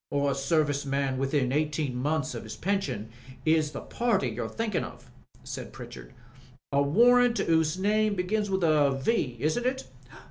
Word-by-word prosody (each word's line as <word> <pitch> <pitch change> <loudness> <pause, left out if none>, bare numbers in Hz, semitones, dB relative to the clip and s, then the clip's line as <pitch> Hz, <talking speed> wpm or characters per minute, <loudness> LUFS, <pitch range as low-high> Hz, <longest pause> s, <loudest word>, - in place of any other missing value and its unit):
"A 140 -1 +1
service 145 +1 +1
man 135 -1 -1
within 135 -1 0
eighteen 150 -2 -1
months 140 +2 -1
of - - -5
his - - -8
pension, 135 - -2 0.3
is 155 -1 +3
the 140 - -6
party 235 -5 0
you're - - -4
thinkin' 225 -4 -2
of," - - -11 0.3
said - - -7
Pritchard, - - -10 0.6
"A 140 0 +3
warrant 240 +10 +5
'pose 160 0 +2
name 210 +2 +2
begins 205 +3 -1
with 190 -1 0
a 145 -4 +3
V., 130 - 0
isn't 155 - 0
it?" 260 +1 -1
155 Hz, 155 wpm, -28 LUFS, 140-205 Hz, 0.6 s, warrant